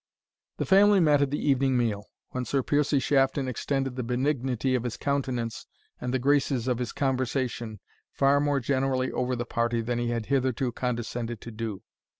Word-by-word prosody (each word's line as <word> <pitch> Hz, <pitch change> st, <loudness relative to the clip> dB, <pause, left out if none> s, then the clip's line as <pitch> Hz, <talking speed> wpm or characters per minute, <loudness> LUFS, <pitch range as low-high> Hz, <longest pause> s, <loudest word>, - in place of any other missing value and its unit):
The -, -, -1 dB
family 200 Hz, +1 st, +6 dB
met 150 Hz, -4 st, +4 dB
at 140 Hz, -, +2 dB
the 145 Hz, -, -1 dB
evening 135 Hz, -2 st, +3 dB
meal, 110 Hz, -4 st, -1 dB, 0.2 s
when 125 Hz, -, -2 dB
Sir 135 Hz, +1 st, 0 dB
Piercie 145 Hz, +1 st, +2 dB
Shafton 135 Hz, 0 st, +2 dB
extended 135 Hz, +1 st, -2 dB
the 130 Hz, -, -2 dB
benignity 130 Hz, 0 st, 0 dB
of 125 Hz, -, +1 dB
his 120 Hz, -2 st, -4 dB
countenance 130 Hz, -5 st, -2 dB, 0.3 s
and 125 Hz, -, -3 dB
the 130 Hz, -, +2 dB
graces 135 Hz, -2 st, +1 dB
of 125 Hz, -2 st, 0 dB
his 125 Hz, -2 st, -2 dB
conversation 130 Hz, -4 st, -2 dB, 0.3 s
far 140 Hz, +1 st, +3 dB
more 145 Hz, -1 st, +1 dB
generally 130 Hz, 0 st, 0 dB
over 125 Hz, 0 st, -1 dB
the 120 Hz, 0 st, -3 dB
party 115 Hz, 0 st, 0 dB
than 120 Hz, +1 st, -1 dB
he 120 Hz, 0 st, -1 dB
had 115 Hz, -2 st, -2 dB
hitherto 130 Hz, -1 st, 0 dB
condescended 120 Hz, -2 st, -3 dB
to 120 Hz, -, -8 dB
do. 110 Hz, -3 st, -5 dB
130 Hz, 175 wpm, -27 LUFS, 120-140 Hz, 0.3 s, family